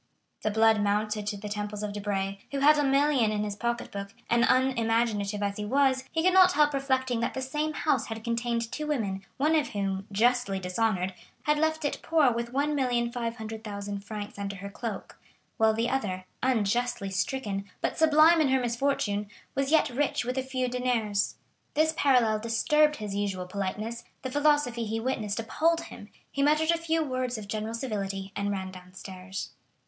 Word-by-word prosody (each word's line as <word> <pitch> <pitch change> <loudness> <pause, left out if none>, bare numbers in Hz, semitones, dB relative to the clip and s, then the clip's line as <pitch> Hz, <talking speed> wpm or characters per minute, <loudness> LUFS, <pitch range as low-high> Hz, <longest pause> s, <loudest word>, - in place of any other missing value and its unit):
The 215 - 0
blood 220 0 +4
mounted 210 +1 0
to 210 -1 -2
the 210 +1 -7
temples 210 0 -4
of 210 -1 -3
Debray, 200 -1 -2
who 280 - -3
held 300 +1 +6
a - - +3
million 275 -4 +3
in 210 0 -1
his 205 -1 -3
pocket 235 +2 -2
book, 200 +1 -6 0.2
and 235 0 +4
unimaginative 225 -5 +1
as 200 0 -1
he 210 - -3
was 260 +2 +2
he 325 - 0
could 370 +1 +4
not 370 -1 +7
help 295 -2 +4
reflecting 260 -3 0
that 235 - -1
the 265 - -2
same 300 +3 -2
house 305 - 0
had 225 -1 -6
contained 235 0 -1
two 300 +4 -4
women, 200 -10 -1
one 305 +4 +3
of 300 -2 +2
whom, 195 -1 -3
justly 240 -1 +2
dishonored, 190 0 0 0.3
had 300 0 +2
left 315 0 +1
it 290 - -1
poor 310 -6 +3
with 235 +1 -3
1,500,000 230 -7 -2
francs 205 0 -7
under 200 0 -3
her 200 +1 -8
cloak, 220 -2 -6 0.4
while 220 0 +4
the 230 +2 +1
other, 195 -9 -2 0.2
unjustly 240 -3 0
stricken, 200 -1 -2
but - - -1
sublime 320 +1 +6
in 300 - +3
her 265 0 +3
misfortune, 235 -5 0 0.2
was 275 0 0
yet 315 +1 +4
rich 270 -1 0
with 250 +1 -2
a 265 - +1
few 260 -1 -2
deniers. 240 -5 0 0.4
This 315 +1 +3
parallel 245 -7 +3
disturbed 300 +7 +3
his 210 -5 -5
usual 195 -3 -2
politeness, 205 +5 -4 0.2
the 260 - -3
philosophy 290 -5 +2
he 220 +1 -2
witnessed 225 -4 -2
appalled 325 +9 +1
him, - - -11 0.2
he 280 - -2
muttered 305 +3 +4
a 335 - +2
few 325 -1 0
words 255 -3 -2
of 210 -2 -8
general 215 +2 -3
civility 195 -5 -3
and 200 0 -1
ran 190 -2 -3
downstairs. 185 +1 -8
230 Hz, 180 wpm, -28 LUFS, 205-270 Hz, 0.4 s, not